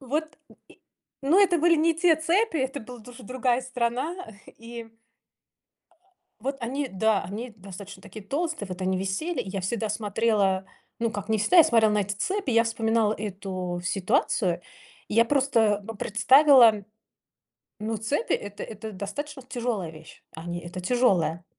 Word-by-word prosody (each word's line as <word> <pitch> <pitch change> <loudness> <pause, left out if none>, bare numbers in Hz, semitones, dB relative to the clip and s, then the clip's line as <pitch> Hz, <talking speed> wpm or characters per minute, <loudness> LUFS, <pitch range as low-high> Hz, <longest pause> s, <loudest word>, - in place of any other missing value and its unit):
Вот, 300 +4 -3
м, - - -19
и, - - -20 0.4
ну, 320 +9 +4
это 355 -3 +3
были 335 +1 +4
не 325 +2 +3
те 330 0 +4
цепи, 335 +4 +1
это 270 +1 -2
была 245 +1 -10
дуж 240 +3 -13
другая 250 +2 0
страна. 255 +5 -2 0.3
И 230 0 -10 1.5
Вот 275 +3 -3
они, 265 +4 -2
да, 220 0 +1
они 220 +7 -6
достаточно 195 0 -10
такие 215 0 -11
толстые, 315 +1 -2
вот 185 +1 -6
они 185 0 0
висели. 195 - -2
И - - -5
я 195 0 -3
всегда 220 +4 -2
смотрела, 205 -2 +1 0.3
ну, 230 -1 0
как 205 0 -6
не 220 - +1
всегда, 220 - +4
я 330 - +10
смотрела 220 -4 +4
на 210 - +2
эти 205 0 -1
цепи, 380 - -2
и 230 - 0
я 230 - +5
вспоминала 225 -1 +1
эту 185 -3 -4
ситуацию. 190 -2 0 0.5
И - - -4
я 230 +1 +6
просто, 230 -6 +2
ну, 225 - -7
представила, 235 0 +5 0.9
ну, 220 +1 -3
цепи- 250 - -1
это 205 0 -3
это 220 0 -7
достаточно 270 +9 -6
тяжелая 235 -8 -3
вещь. 155 - -14
Они- 175 +2 -5
это 175 +2 -7
тяжелая. 180 -6 +1
225 Hz, 160 wpm, -26 LUFS, 200-270 Hz, 1.5 s, я